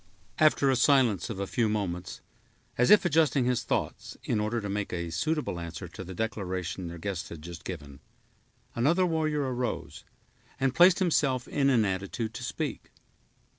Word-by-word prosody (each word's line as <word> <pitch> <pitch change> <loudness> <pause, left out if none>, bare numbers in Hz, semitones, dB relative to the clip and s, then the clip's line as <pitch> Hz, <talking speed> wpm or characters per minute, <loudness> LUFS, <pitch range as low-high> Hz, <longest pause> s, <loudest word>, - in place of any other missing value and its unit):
After 150 -3 +4
a - - +2
silence 125 - +3
of 105 -4 -5
a 100 - -1
few 110 +2 0
moments, 95 -4 -3 0.5
as 125 - +3
if 210 -2 +7
adjusting 155 -5 +3
his 125 -1 +1
thoughts, - - -3
in 110 - 0
order 105 +3 -1
to 105 - -5
make 100 0 -3
a 85 -2 -3
suitable 150 - -1
answer 85 +2 -6
to 90 +2 -8
the 95 0 -8
declaration 95 -4 -3
their 85 +1 -7
guests 95 +1 -4
had 80 -2 -9
just 85 0 -8
given, 75 -5 -7 0.7
another 165 +10 +2
warrior 155 -3 0
arose, 125 -1 -4 0.6
and 135 -1 +1
placed 175 +3 +6
himself 140 -8 +1
in 140 -2 +1
an 120 -5 +4
attitude 100 +4 -3
to 125 - -7
speak. 120 - -4
110 Hz, 170 wpm, -28 LUFS, 90-140 Hz, 0.7 s, if